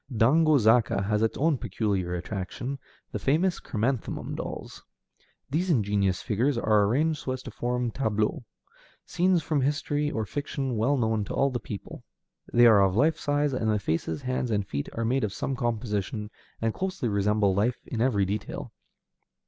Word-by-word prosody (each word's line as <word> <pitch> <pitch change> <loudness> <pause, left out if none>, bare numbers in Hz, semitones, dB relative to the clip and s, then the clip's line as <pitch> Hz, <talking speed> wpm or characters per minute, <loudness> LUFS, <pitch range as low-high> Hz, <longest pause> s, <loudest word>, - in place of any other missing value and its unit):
Dango 150 +7 +4
Zaka 110 -3 +3
has 105 +1 +1
its 110 - +1
own 150 -2 +2
peculiar 95 -5 -1
attraction, 105 +9 -4 0.3
the - - -3
famous 170 +6 +1
chrysanthemum 120 +2 -2
dolls. - - -6 0.7
These 175 +6 0
ingenious 100 - +1
figures 125 +4 +1
are 110 -3 +3
arranged 150 +8 +1
so 130 - -3
as 130 - -6
to - - -8
form 125 -1 -1
tableaux, 110 -2 -1 0.6
scenes 180 -2 +2
from 150 -2 0
history 145 +1 0
or 110 -6 -2
fiction 135 +1 -3
well 125 +7 +2
known 110 -3 +1
to - - -5
all 140 0 +2
the 120 - -2
people. 100 -4 -8 0.5
They 120 0 +6
are 110 -4 +7
of 95 -1 +2
life 150 +8 +3
size, 145 -1 0
and 115 -3 0
the 105 - +2
faces, 80 -4 -2
hands, 130 -1 -1
and 100 -3 0
feet 70 -4 -3
are 115 - -2
made 130 +3 +1
of 105 -2 -1
some 135 - -2
composition, 105 -3 -2 0.3
and 115 -1 +1
closely 190 -8 -2
resemble 100 -1 +2
life 110 +6 +1
in 115 - -3
every 110 -6 +2
detail. 100 +2 -4
115 Hz, 170 wpm, -27 LUFS, 105-140 Hz, 0.7 s, are